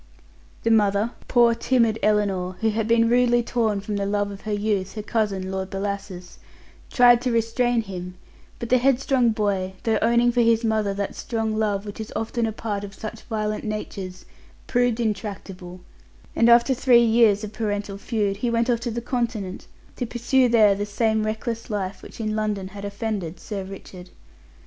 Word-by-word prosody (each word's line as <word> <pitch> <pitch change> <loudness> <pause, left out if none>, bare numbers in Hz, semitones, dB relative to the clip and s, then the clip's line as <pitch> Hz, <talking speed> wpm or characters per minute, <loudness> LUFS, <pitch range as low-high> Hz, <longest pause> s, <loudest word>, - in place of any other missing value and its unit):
The 230 - +2
mother 210 +1 +3 0.2
poor, 240 -1 +5
timid 230 -2 +1
Ellinor, 200 -4 +1
who 220 0 +2
had 220 0 -1
been 230 0 +4
rudely 240 0 +3
torn 220 -4 0
from 205 0 -3
the 200 - -1
love 205 0 0
of 200 - -9
her 215 - -5
youth, 205 -2 -1
her 215 - -4
cousin, 200 -4 -1
Lord 190 0 -3
Bellasis 195 -2 -5 0.5
tried 245 -1 +6
to 250 0 -1
restrain 230 +1 +1
him, 180 -2 -7 0.4
but 235 - -6
the 255 - +4
head 260 0 +3
strong 260 -3 +2
boy, 200 -4 -1
though 220 -2 +1
owning 235 +1 +3
for 240 0 +2
his 230 0 +3
mother 215 -2 +1
that 200 0 -3
strong 225 -2 -2
love 210 -2 0
which 205 +1 -8
is 220 - -7
often 225 +1 -1
a - - -2
part 210 -2 -4
of 200 -1 -8
such 220 +1 -7
violent 215 -1 -2
natures, 195 -4 -5 0.4
proved 245 -2 +1
intractable, 195 -4 -4 0.5
and 230 - +4
after 235 +3 +6
three 240 -2 +5
years 225 -2 +4
of 215 0 -6
parental 205 -2 -3
feud, 205 -3 -1
he 240 +3 -1
went 235 +1 +1
off 235 - +1
to 240 +1 -3
the 235 +1 -3
Continent, 230 -6 -3 0.3
to 245 - -2
pursue 245 +2 +2
there 215 -3 +5
the 200 +1 -3
same 220 +1 0
reckless 225 +1 -4
life 200 -2 -3
which - - -12
in 215 -1 -2
London 210 -3 -2
had 200 0 -9
offended 200 -4 -4
Sir 200 -3 -5
Richard. 190 -1 -10
215 Hz, 180 wpm, -24 LUFS, 200-235 Hz, 0.5 s, tried